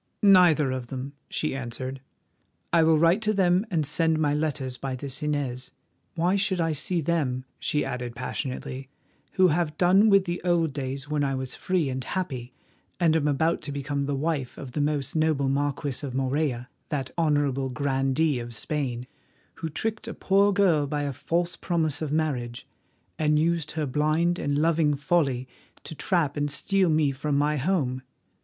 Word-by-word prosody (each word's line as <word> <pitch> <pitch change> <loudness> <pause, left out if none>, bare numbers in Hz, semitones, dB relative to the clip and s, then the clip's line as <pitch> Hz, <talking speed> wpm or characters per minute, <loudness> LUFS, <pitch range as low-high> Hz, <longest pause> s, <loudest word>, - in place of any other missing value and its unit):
"Neither 175 -8 +6
of 130 -2 -4
them," 135 +2 -6 0.2
she 155 -3 -2
answered. 130 +1 -5 0.7
"I 170 - +6
will 160 0 +5
write 170 +6 +4
to 215 0 +1
them 185 +2 +3
and 165 -6 0
send 160 +2 +2
my 150 -2 +1
letters 150 -4 -2
by 130 0 -4
this 135 +3 -5
Inez. 140 -4 -2 0.4
Why 175 +3 +2
should 190 -2 0
I 165 -1 +1
see 170 +4 -1
them," 140 -6 -1
she 150 - 0
added 125 -1 -4
passionately, 130 +1 -5 0.4
"who 185 -1 +5
have 155 -1 0
done 190 +4 +5
with 195 -2 +5
the 175 -1 -3
old 170 -4 +1
days 135 0 -4
when 150 -1 0
I 135 -1 0
was 130 -1 -4
free 180 -5 0
and 130 -1 -3
happy, 130 -10 -4 0.5
and 165 -3 +3
am 150 -2 +2
about 160 +4 +1
to 145 - -5
become 140 0 -2
the 145 - -1
wife 140 -3 -2
of 135 -3 -8
the 145 - -1
most 145 -1 -1
noble 155 -4 +2
Marquis 140 0 -1
of 130 -3 -4
Morella, 135 -2 -1 0.2
that 135 -3 -3
honourable 145 -5 +1
grandee 135 +2 +1
of 120 -1 -7
Spain, 125 -2 -3 0.5
who 165 - -4
tricked 215 +7 -2
a 230 - -5
poor 200 +1 +3
girl 180 -8 +3
by 145 +1 -2
a 140 -1 -2
false 170 +6 -1
promise 160 -4 -1
of 155 -3 -2
marriage, 130 -7 -2 0.5
and 150 -1 +3
used 165 0 0
her 155 -1 -1
blind 155 +5 +1
and 145 0 0
loving 155 -1 +2
folly 140 -4 0 0.4
to - - -7
trap 155 -2 0
and 145 0 0
steal 190 +6 +1
me 155 -2 +3
from 140 +1 -1
my 150 +1 +2
home? 135 -5 0
150 Hz, 175 wpm, -26 LUFS, 135-165 Hz, 0.7 s, Neither